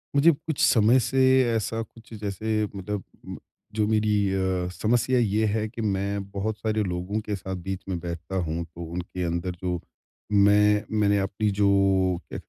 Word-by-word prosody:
मुझे 160 Hz, +4 st, +6 dB
कुछ 155 Hz, 0 st, -5 dB
समय 115 Hz, +3 st, +5 dB
से 130 Hz, +2 st, +1 dB, 0.3 s
ऐसा 115 Hz, +1 st, -1 dB
कुछ 115 Hz, 0 st, -12 dB
जैसे 105 Hz, +2 st, -2 dB, 0.2 s
मतलब 100 Hz, 0 st, -4 dB, 0.7 s
जो 105 Hz, -1 st, +2 dB
मेरी 110 Hz, -1 st, +2 dB, 0.2 s
अ, 95 Hz, -2 st, 0 dB
समस्या 120 Hz, +5 st, +1 dB
ये 110 Hz, -1 st, +2 dB
है 110 Hz, +1 st, 0 dB
कि 115 Hz, -, -7 dB
मैं 100 Hz, -1 st, -1 dB
बहुत 105 Hz, +2 st, -2 dB
सारे 110 Hz, 0 st, 0 dB
लोगों 90 Hz, +3 st, -2 dB
के 105 Hz, -, -2 dB
साथ 95 Hz, 0 st, -5 dB
बीच 95 Hz, -1 st, -4 dB
में 90 Hz, -2 st, -2 dB
बैठता 85 Hz, +2 st, -6 dB
हूँ 80 Hz, +2 st, -2 dB
तो 85 Hz, 0 st, -10 dB
उनके 90 Hz, +2 st, -5 dB
अंदर 85 Hz, +1 st, -2 dB
जो 90 Hz, -1 st, -1 dB, 0.5 s
मैं 105 Hz, +1 st, +4 dB, 0.2 s
मैंने 100 Hz, -1 st, +3 dB
अपनी 100 Hz, +2 st, -1 dB
जो 100 Hz, -, +4 dB, 0.6 s
कहते -, -, -6 dB
105 Hz, 165 wpm, -25 LUFS, 95-110 Hz, 0.7 s, मुझे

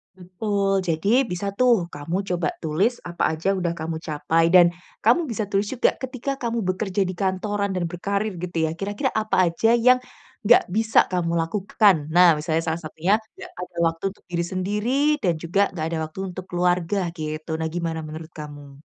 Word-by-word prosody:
Betul, 195 Hz, +2 st, -1 dB
jadi 205 Hz, +11 st, +2 dB
bisa 200 Hz, +3 st, -2 dB
tuh 230 Hz, -9 st, +3 dB
kamu 165 Hz, +7 st, -3 dB
coba 175 Hz, -3 st, 0 dB, 0.2 s
tulis 190 Hz, +11 st, 0 dB
apa 170 Hz, -2 st, -1 dB
saja 180 Hz, +5 st, 0 dB
sudah 180 Hz, -3 st, -1 dB
kamu 160 Hz, 0 st, -3 dB
capai 160 Hz, 0 st, +1 dB
dan 175 Hz, -1 st, +6 dB, 0.3 s
kamu 290 Hz, +9 st, +4 dB
bisa 225 Hz, -2 st, -2 dB
tulis 200 Hz, 0 st, -1 dB
juga 250 Hz, +2 st, +2 dB
ketika 260 Hz, +1 st, -4 dB
kamu 235 Hz, -2 st, -2 dB
bekerja 190 Hz, +1 st, 0 dB
di 185 Hz, -, -3 dB
kantoran 200 Hz, +1 st, -1 dB
dan 180 Hz, -, -1 dB
berkarir 200 Hz, +4 st, -2 dB
gitu 175 Hz, -1 st, -5 dB
ya 160 Hz, -, +1 dB
kira-kira 205 Hz, +7 st, -1 dB
apa 215 Hz, 0 st, -1 dB, 0.2 s
aja 225 Hz, +7 st, +3 dB
yang 250 Hz, +2 st, +5 dB, 0.5 s
nggak 240 Hz, -, +7 dB
bisa 220 Hz, 0 st, +3 dB
kamu 175 Hz, -2 st, 0 dB
lakukan, 200 Hz, +3 st, +3 dB, 0.2 s
nah 175 Hz, -3 st, +7 dB
misalnya 160 Hz, +1 st, -1 dB
salah 160 Hz, 0 st, -2 dB
satunya 170 Hz, +6 st, 0 dB, 0.2 s
enggak -, -, -10 dB
ada 180 Hz, -1 st, -8 dB
waktu 165 Hz, 0 st, -4 dB
untuk -, -, -28 dB
diri 170 Hz, -1 st, -1 dB
sendiri 205 Hz, +6 st, -1 dB, 0.3 s
dan 175 Hz, -3 st, +3 dB
juga 175 Hz, +4 st, +1 dB
enggak 160 Hz, -3 st, -3 dB
ada 165 Hz, -, -2 dB
waktu 155 Hz, +4 st, -11 dB
untuk 185 Hz, 0 st, -8 dB
keluarga 180 Hz, +1 st, 0 dB, 0.2 s
gitu, 155 Hz, 0 st, -5 dB
nah 160 Hz, -, -1 dB
gimana 165 Hz, -2 st, -2 dB
menurut 155 Hz, +1 st, -8 dB
kamu? 145 Hz, -2 st, -10 dB
180 Hz, 180 wpm, -23 LUFS, 165-205 Hz, 0.5 s, nggak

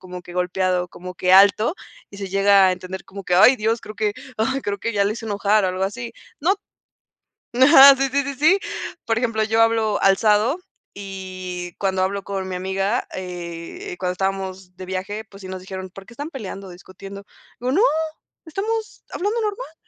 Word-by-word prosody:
como 180 Hz, -1 st, -9 dB
que 175 Hz, -, -12 dB
golpeado, 180 Hz, 0 st, 0 dB
como 180 Hz, +1 st, -9 dB
que 180 Hz, +1 st, +1 dB
alto 200 Hz, -, +6 dB, 0.4 s
y 200 Hz, -, -11 dB
se 195 Hz, -1 st, -5 dB
llega 195 Hz, 0 st, +5 dB
a 185 Hz, -, +3 dB
entender 185 Hz, 0 st, -7 dB
como 195 Hz, +1 st, -9 dB
que 180 Hz, -, 0 dB
¡ay 220 Hz, +8 st, +7 dB
Dios! 225 Hz, 0 st, 0 dB
creo 215 Hz, -, -9 dB
que 210 Hz, -1 st, 0 dB, 0.5 s
creo 200 Hz, 0 st, -2 dB
que 230 Hz, -, -2 dB
ya 200 Hz, -2 st, +2 dB
lo 205 Hz, -, +1 dB
hice 225 Hz, 0 st, -7 dB
enojar 205 Hz, 0 st, +2 dB
o -, -, +2 dB
algo 185 Hz, +1 st, -1 dB
así. 235 Hz, +4 st, -5 dB, 0.3 s
No, 365 Hz, +7 st, +2 dB, 1.0 s
ajá, 270 Hz, +2 st, +9 dB
sí 270 Hz, 0 st, 0 dB
sí 280 Hz, 0 st, +1 dB
sí 280 Hz, -, -4 dB
sí. 310 Hz, +9 st, +4 dB, 0.5 s
Por 225 Hz, -1 st, +1 dB
ejemplo, 230 Hz, -3 st, 0 dB
yo 225 Hz, +1 st, +2 dB
hablo 225 Hz, -2 st, +2 dB
alzado 210 Hz, -, +3 dB, 0.4 s
y 185 Hz, -3 st, -6 dB
cuando 190 Hz, -1 st, 0 dB
hablo 195 Hz, +1 st, -2 dB
con 195 Hz, -1 st, -4 dB
mi 185 Hz, -, -4 dB
amiga, 195 Hz, +5 st, -1 dB
eh, 180 Hz, -, -7 dB
cuando 180 Hz, 0 st, -1 dB
estábamos 190 Hz, -1 st, -4 dB
de 185 Hz, -, -7 dB
viaje, 190 Hz, +4 st, -4 dB
pues 200 Hz, -2 st, -15 dB
sí, 185 Hz, -, -8 dB
nos 185 Hz, -, -5 dB
dijeron, 190 Hz, 0 st, -7 dB
¿por 195 Hz, +1 st, -12 dB
qué 245 Hz, -, -14 dB
están 290 Hz, +6 st, -6 dB
peleando, 200 Hz, -, -7 dB
discutiendo? 195 Hz, +2 st, -11 dB, 0.4 s
Le 245 Hz, -, -5 dB
digo -, -, +2 dB
no, 380 Hz, -, +3 dB, 0.6 s
estamos 430 Hz, +7 st, -4 dB
hablando 420 Hz, +5 st, -1 dB
normal. 420 Hz, -4 st, -4 dB
200 Hz, 190 wpm, -22 LUFS, 185-230 Hz, 1.0 s, ajá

